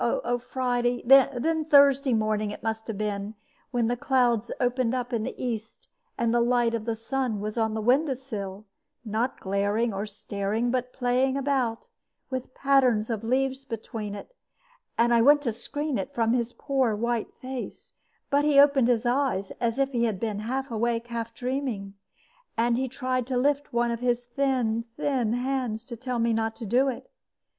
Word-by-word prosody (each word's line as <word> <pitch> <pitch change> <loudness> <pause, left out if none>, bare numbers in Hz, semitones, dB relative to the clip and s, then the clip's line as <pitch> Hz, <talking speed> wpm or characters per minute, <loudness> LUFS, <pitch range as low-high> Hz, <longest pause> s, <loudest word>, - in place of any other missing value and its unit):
Oh, 240 +1 0
Friday 245 -1 -1
then 275 +4 +4
Thursday 280 -3 +5
morning 215 -1 0
it 205 - -8
must 220 0 -3
have 225 -3 -4
been, 205 0 -3 0.3
when 240 -2 0
the 240 +2 +1
clouds 240 -3 +1
opened 250 -1 +1
up 245 0 -3
in 230 - +1
the - - -4
east, 225 -3 -5 0.3
and 235 -1 +1
the 240 - +3
light 240 -1 +2
of 225 -2 -2
the 230 -1 -1
sun 225 0 -2
was 210 +1 -4
on 220 -2 0
the 220 - -2
window 265 +4 +3
sill, 210 -6 -6 0.4
not 225 +4 -1
glaring 205 +4 0
or 200 +2 -3
staring, 210 +3 -2
but 250 0 -1
playing 255 +2 +1
about, 265 -5 0 0.5
with 255 0 -5
patterns 255 -5 +3
of 225 -1 -3
leaves 265 +3 0
between 220 -4 -5
it; - - -10 0.6
and 240 +1 +4
I 230 - +5
went 290 +4 +6
to 240 - 0
screen 290 +5 -3
it 280 +1 -5
from 230 -1 +2
his 240 -1 0
poor 265 -5 0
white 235 +1 -1
face; 260 -1 -7 0.4
but 285 +1 +3
he 295 -2 +5
opened 280 -3 +6
his 245 -1 +2
eyes, 245 -6 0
as 235 0 0
if 275 0 +1
he 235 -2 +1
had 215 -5 -1
been 215 -3 -2
half 260 +4 -3
awake, 235 +1 -1
half 230 -1 -4
dreaming, 245 -6 -3 0.6
and 235 +1 +2
he 260 +2 0
tried 255 -1 -2
to 260 -1 -1
lift 285 +3 +1
one 240 0 +1
of 235 - -3
his 245 0 0
thin, 240 -3 0
thin 260 -7 0
hands 245 -3 -2
to 235 - -7
tell 250 +1 -3
me 230 0 +2
not 225 0 -1
to 230 - -7
do 250 +6 +3
it. 260 - -4
240 Hz, 185 wpm, -26 LUFS, 225-260 Hz, 0.6 s, went